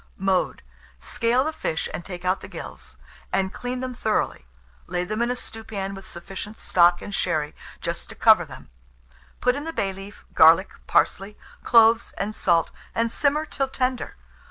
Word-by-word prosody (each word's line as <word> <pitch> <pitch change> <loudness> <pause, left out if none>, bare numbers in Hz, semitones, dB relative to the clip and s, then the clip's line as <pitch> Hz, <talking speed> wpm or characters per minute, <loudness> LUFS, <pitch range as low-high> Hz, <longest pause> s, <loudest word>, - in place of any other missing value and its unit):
Mode. 190 -1 0 0.4
Scale 235 - +1
the 315 +2 -2
fish 160 - -2
and 165 +3 -4
take 180 -1 -8
out 185 +1 +1
the - - -8
gills, - - -9 0.3
and 190 0 0
clean 250 +1 -4
them 255 -1 -3
thoroughly; 215 - -1 0.4
lay 180 0 -1
them 215 +5 -3
in 240 - +1
a 250 - 0
stewpan 220 -5 -6
with 195 0 -9
sufficient 195 +5 -7
stock 175 0 +4
and 205 - -7
sherry 155 -6 0 0.3
just - - -4
to - - -9
cover - - +6
them. - - -12 0.7
Put 250 - +4
in 285 - -4
the 325 - -4
bay 195 -11 -1
leaf, 195 +2 -11
garlic, 165 +4 +6 0.2
parsley, 200 +2 +1 0.3
cloves, 230 0 +5
and 205 +2 -2
salt, 170 -5 +2 0.2
and 230 0 +1
simmer 295 +4 +1
till 275 -3 -2
tender. 255 -1 -2
205 Hz, 170 wpm, -24 LUFS, 185-245 Hz, 0.7 s, cover